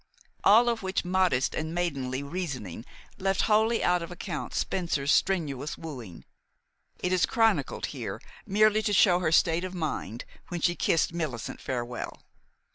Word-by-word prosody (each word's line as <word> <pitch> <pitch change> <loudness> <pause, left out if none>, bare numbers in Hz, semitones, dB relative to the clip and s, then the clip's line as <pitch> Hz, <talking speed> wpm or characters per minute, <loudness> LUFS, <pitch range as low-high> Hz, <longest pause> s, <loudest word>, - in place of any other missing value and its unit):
All 225 +4 +6
of 235 -1 0
which 190 -1 -2
modest 180 -8 +2
and 160 +1 -3
maidenly 140 -6 -2
reasoning 140 - -5 0.3
left 195 0 +1
wholly 220 +2 +3
out 180 0 +3
of 170 - -6
account 175 -2 -5
Spencer's 155 -6 0
strenuous 150 -7 0
wooing; 125 - -9 0.7
it 180 0 -1
is 180 - +3
chronicled 225 -1 +1
here - - -5 0.3
merely 215 +1 +4
to 210 -1 0
show 180 -2 +5
her 165 -3 0
state 165 +1 +3
of 185 0 -5
mind 140 - -4 0.2
when 175 - -4
she 175 - +2
kissed 165 -1 +1
Millicent 150 -9 -4
farewell. 120 -2 -4
175 Hz, 145 wpm, -28 LUFS, 140-190 Hz, 0.7 s, All